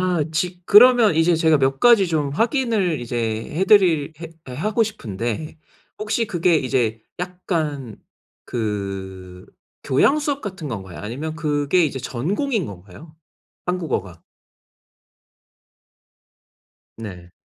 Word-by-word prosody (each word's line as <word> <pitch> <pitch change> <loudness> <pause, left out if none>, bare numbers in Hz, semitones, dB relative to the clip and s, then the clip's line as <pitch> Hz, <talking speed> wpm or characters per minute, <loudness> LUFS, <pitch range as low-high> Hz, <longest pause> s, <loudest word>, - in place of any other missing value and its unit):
아 180 -4 +1
지 180 +3 -2
그러면 230 -3 +7
이제 165 +1 +3
제가 160 -1 +3
몇 135 0 +1
가지 230 -6 +5
좀 150 -4 0
확인을 220 - 0
이제 120 0 -5 0.4
해드릴 180 -6 +4
해 165 - -7 0.2
하고 210 - 0
싶은데 120 - -4 0.4
혹시 215 +2 -1
그게 175 -3 +2
이제 120 -5 0 0.2
약간 160 - -3 0.5
그 95 -5 -5 0.4
교양 205 - +3
수업 290 -2 -2
같은 190 -6 -6
건가요? 95 -8 -7
아니면 145 +9 -5
그게 150 +2 +1
이제 135 -3 -3
전공인 190 - -2
건가요? 100 - -12 0.5
한국어가? 130 - -3 2.8
네. 90 -6 -9
155 Hz, 215 characters per minute, -21 LUFS, 120-185 Hz, 2.8 s, 그러면